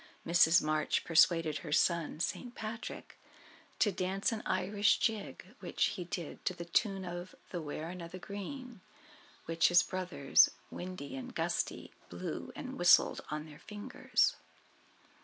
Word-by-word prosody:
Mrs. 170 0 +5
March 155 0 +1
persuaded 165 -2 +4
her 150 +1 -8
son, 165 -1 +2
St. 245 +8 -3
Patrick, 220 +1 -7 0.6
to 210 - +3
dance 190 +3 -1
an 220 -1 -3
Irish 200 +3 +2
Jig, 220 -3 -3
which - - 0
he 180 -4 -5
did 170 -2 -6
to 185 - 0
the 170 -1 -7
tune 195 +2 0
of 175 +1 -6 0.2
the 175 - -3
"Wearing 160 +4 -5
of 170 0 -8
the 185 - -7
Green," 215 +5 -7 0.6
which 165 +1 +3
his 175 0 +6
brothers, 175 -7 +3 0.2
Windy 180 - -6
and 255 -2 -7
Gusty, - - -2 0.2
blew - - -5
and 265 -1 -7
whistled 175 0 +5
on 150 0 -4
their 150 -2 -13
fingers. 210 -1 0
180 Hz, 140 wpm, -33 LUFS, 165-205 Hz, 0.6 s, his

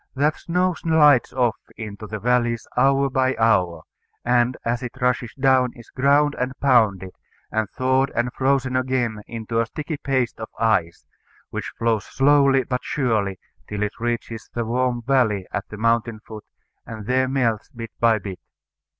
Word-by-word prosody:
That 150 +3 +2
snow 180 +1 0
slides 150 -6 +4
off 125 -3 +1 0.2
into 105 -1 -7
the 110 - -5
valleys 120 +1 0
hour 135 0 +3
by 130 -1 +1
hour, 95 -7 +2 0.4
and 120 +1 +2
as 120 +2 -1
it 125 +1 -7
rushes 125 -2 0
down 130 -2 +3
is 120 - -15
ground 145 +2 +3
and 125 +1 -1
pounded, 110 -9 +3 0.4
and 110 -2 -1
thawed 130 +3 +1
and 120 +2 0
frozen 135 -1 +1
again 125 -4 0
into 115 0 -3
a 115 - -2
sticky 150 +4 -5
paste 130 -5 -1
of 110 - -6
ice, 110 -7 0 0.5
which - - -4
flows 115 -2 0
slowly 135 -1 +3
but 125 0 -3
surely 110 -8 0 0.3
till 105 0 -2
it 105 +2 -4
reaches 115 -1 -3
the 120 -1 -1
warm 120 +1 0
valley 115 -7 +2
at - - -4
the 105 - -8
mountain 115 0 +1
foot, 110 -1 -10 0.4
and 110 -2 -8
there 130 +2 +2
melts 120 -5 0
bit 115 -2 -8
by 115 -1 +4
bit. 100 -3 -7
120 Hz, 160 wpm, -22 LUFS, 110-130 Hz, 0.5 s, slides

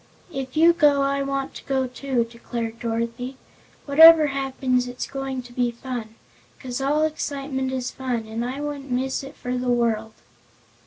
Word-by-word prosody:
"If 265 0 -5
you 335 +2 +7
go 295 -4 +4
I 275 0 0
want 275 0 -2
to - - -10
go, 265 -1 +1
too," 255 -1 -1
declared 230 -1 -6
Dorothy. 235 +3 -3 0.5
"Whatever 320 +2 +9
happens 260 -2 0
it's 245 0 -4
going 270 -2 -4
to 245 0 -14
be 245 -1 +1
fun 235 -2 -6 0.4
'cause 250 0 -5
all 295 +3 +2
excitement 275 -3 -2
is 255 -2 -3
fun 245 -4 -3
and 220 +2 -4
I 260 +4 -4
wouldn't 290 -2 -5
miss 260 +2 -1
it 275 +1 -10
for 250 0 -4
the 250 0 -1
world!" 225 -2 +1
260 Hz, 165 wpm, -24 LUFS, 245-275 Hz, 0.5 s, Whatever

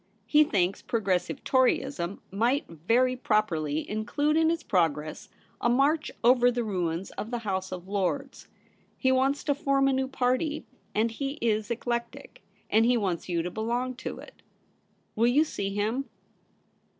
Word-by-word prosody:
He 300 0 +5
thinks 195 -8 0
Progressive 195 -6 -1
Toryism 260 -7 +1
might 235 +8 +1
very 230 +11 +1
pro 215 -4 +2
perly 155 -5 -2
include 290 +8 0
in 320 0 +4
its 335 0 -1
progress 155 -5 0 0.3
a 240 - +2
march 285 +5 +2
over 245 +1 +6
the 240 -1 -1
ruins 180 -4 -2
of 215 - -4
the 240 - -2
House 190 -4 -3
of 180 0 -7
Lords. 205 +8 -2 0.5
He 260 - +2
wants 265 +2 +2
to 285 - +2
form 275 -1 +2
a 270 - +3
new 265 0 0
party; 265 +4 0 0.3
and 225 +2 +2
he 275 +4 -3
is 220 -7 -1
eclectic; 235 0 -4 0.3
and 220 +1 +4
he 245 +1 +4
wants 185 -5 -2
you 170 -2 0
to 180 - -4
belong 240 +5 -2
to - - -5
it. - - -13 0.7
Will 230 +2 +3
you 275 +6 +4
see 200 -10 -3
him 220 +7 -1
235 Hz, 160 wpm, -28 LUFS, 195-265 Hz, 0.7 s, over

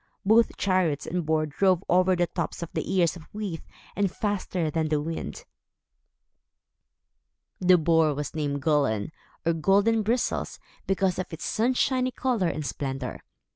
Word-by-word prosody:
Both 225 +3 +4
chariot 185 -7 +1
and 180 0 -2
boar 155 -1 +2
drove 185 +4 +2
over 185 +1 +4
the 175 0 +2
tops 170 - -4
of 165 - -8
the - - -3
ears 180 -3 +2
of 165 -3 -12
wheat, 200 -6 -4 0.3
and 200 -1 +1
faster 185 -6 -2
than 160 -1 0
the 150 -1 +1
wind. 165 - -5 2.1
The 185 0 +5
Boar 160 -2 +3
was 145 0 -4
named 145 -3 -2
Gullin, 140 -8 +1 0.3
or 165 - +3
Golden 200 +7 +3
Bristles 235 +4 -1 0.3
because 190 -1 +1
of 185 - -4
its 160 - -6
sunshiny 255 +2 +1
color 245 -7 0
and 155 -2 -3
splendor. 135 -3 -4
175 Hz, 145 wpm, -26 LUFS, 155-200 Hz, 2.1 s, The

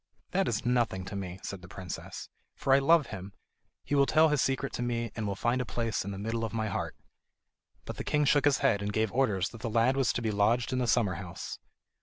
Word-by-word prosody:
"That - - +1
is - - -1
nothing 120 -7 +1
to 100 - -6
me," 95 -2 -5
said 100 -2 -6
the 90 - -11
princess, 90 -2 -7 0.3
"for 135 - +2
I 135 - +7
love 155 +2 +5
him. 95 0 -7 0.5
He - - -4
will 140 -1 +4
tell 160 +1 +5
his 150 -3 +2
secret 135 +1 0
to - - -3
me, 120 -2 -1
and 110 -2 -2
will 100 - -2
find 120 +5 0
a - - 0
place 115 -3 -2
in 100 - -5
the 100 - -5
middle 115 +3 -2
of 115 - -3
my 110 -1 -1
heart." - - -3 0.9
But - - -6
the - - -4
king 150 0 +1
shook 145 0 +4
his 145 -1 +4
head, 100 -7 +3
and 100 0 -2
gave 110 0 0
orders 105 -9 +1
that 115 - -12
the 115 - -2
lad 115 +4 +3
was 135 -2 +2
to - - -2
be 110 - 0
lodged 110 +5 +2
in 130 - +1
the 125 - 0
summer 115 -6 +3
house. 85 -2 -7
115 Hz, 250 wpm, -30 LUFS, 100-130 Hz, 0.9 s, I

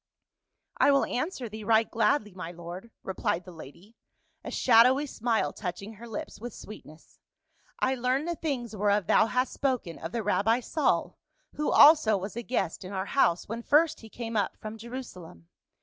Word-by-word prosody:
" - - -58 0.3
I - - +4
will 275 -1 +4
answer 260 -1 -3
thee 215 0 -8
right 220 +1 +3
gladly, 215 -1 +1
my 180 -2 -7
lord," 175 +5 -9
replied 180 -2 -2
the 180 - -10
lady, 170 - -13 0.5
a - - -6
shadowy 255 +4 +5
smile 235 -4 -1
touching 195 +2 -6
her 230 +3 -11
lips 215 -3 -7
with 240 0 -7
sweet 215 - -11
ness. 155 +2 -18 0.3
" - - -33
I 260 - +2
learned 260 +4 0
the 345 - 0
things 255 -9 -4
whereof 205 -1 +1
thou 215 - +4
hast 250 +3 0
spoken, 250 -12 -2
of 165 - -6
the 230 -2 -3
rabbi 220 +3 +2
Saul, 295 +5 -1 0.3
who 300 - -1
also 290 -8 +7
was 195 +2 -6
a 235 - -3
guest 235 -9 -2
in 185 - -8
our 190 0 -2
house, 180 -11 +2
when 230 +2 -5
first 310 +5 +3
he 225 - -13
came 230 0 -6
up 205 - 0
from 215 0 -7
Jerusalem. 215 - -9
225 Hz, 185 wpm, -28 LUFS, 195-255 Hz, 0.5 s, also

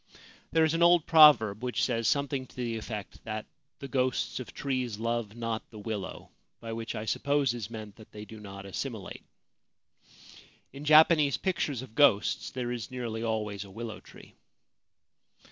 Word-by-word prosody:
There 160 - +4
is 160 0 +2
an 165 - 0
old 170 -2 +6
proverb 125 -10 +6
which 125 -1 -1
says 115 -3 0
something 140 -2 0
to - - -20
the 120 -2 -3
effect 105 -2 -7
that 110 -1 -5 0.2
' 140 - -52
the 140 - -5
ghosts 130 -1 -1
of 125 - -7
trees 130 -6 -2
love 115 -1 -2
not 115 -1 -4
the 110 - -12
willow 105 -2 -6
'; - - -51
by 115 -1 -6
which, 115 0 -5
I 105 - -4
suppose, 140 +2 +1
is 115 -3 -5
meant 110 -3 -8
that 110 - -15
they 105 0 -9
do 110 +1 -11
not 100 -1 -9
assimilate. 110 +1 -6 1.5
In 140 +2 -8
Japanese 155 -2 +6
pictures 145 - -1
of 120 -4 -12
ghosts 115 -5 +3
there 125 -1 -4
is 120 -2 -4
nearly 120 -3 -4
always 105 -3 -2
a 100 - -13
willow 110 +2 -7
tree. - - -16
115 Hz, 175 wpm, -29 LUFS, 110-140 Hz, 1.5 s, old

